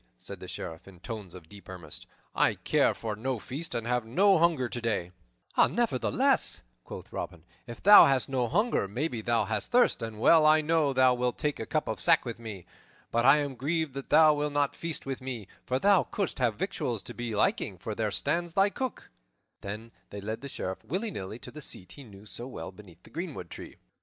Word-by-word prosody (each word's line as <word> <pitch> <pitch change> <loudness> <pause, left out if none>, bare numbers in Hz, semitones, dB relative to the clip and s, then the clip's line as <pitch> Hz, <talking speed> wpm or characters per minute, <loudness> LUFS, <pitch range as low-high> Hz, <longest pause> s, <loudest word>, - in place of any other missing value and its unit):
said - - -9
the - - -9
Sheriff 80 +2 -7
in 95 -3 -14
tones 105 -3 -7
of 85 -3 -12
deep 100 +2 -14
earnest. 85 -5 -8 0.3
"I - - +3
care - - +2
for 110 -2 -4
no 125 +4 -2
feast 140 +9 -5
and 115 -1 -2
have 125 0 0
no 190 - +4
hunger 160 -7 +2
today." 115 -8 -2 0.4
"Nevertheless," - - +2 0.2
quoth - - -10
Robin, 85 -2 -6 0.2
"if 120 -1 -9
thou 205 +2 +10
hast 135 -2 +2
no 130 -3 0
hunger, 205 - +1
maybe 120 +3 -3
thou 115 0 +1
hast 110 -2 -2
thirst, 245 0 +3
and 110 -2 -5
well 160 +7 +6
I 155 +1 +6
know 155 -2 +2
thou 130 -1 +4
wilt 125 0 -1
take 150 -1 -2
a 110 - -5
cup - - -1
of - - -3
sack - - +5
with 115 -1 -5
me. 105 -6 -8 0.5
But 115 +1 +1
I 145 - +8
am 145 -2 -2
grieved 150 +3 -2
that 140 -1 -7
thou 155 -1 +7
wilt 150 0 -2
not 145 -1 +1
feast 165 -2 -5
with 135 -1 -4
me, 125 -6 -5 0.2
for 130 - +1
thou 200 +4 +5
couldst 200 -8 -3
have 120 -4 +1
victuals 115 +1 -3
to - - -8
thy 120 - -5
liking, 100 -2 +1
for 110 +5 -5
there 110 0 -1
stands 165 - -1
thy 195 +2 +3
Cook." 260 0 -5 0.5
Then 105 +3 -7 0.2
he 100 - -7
led 110 +3 -5
the 140 - -7
Sheriff, 95 -7 -5
willy 200 - -3
nilly, 100 - -6
to - - -8
the 150 - -9
seat 90 -9 -7
he 140 - -11
knew 100 -3 -14
so 120 +3 -6
well 130 - -7
beneath 90 -3 -16
the - - -17
greenwood 155 - -6
tree. - - -9
125 Hz, 210 wpm, -29 LUFS, 105-150 Hz, 0.5 s, thou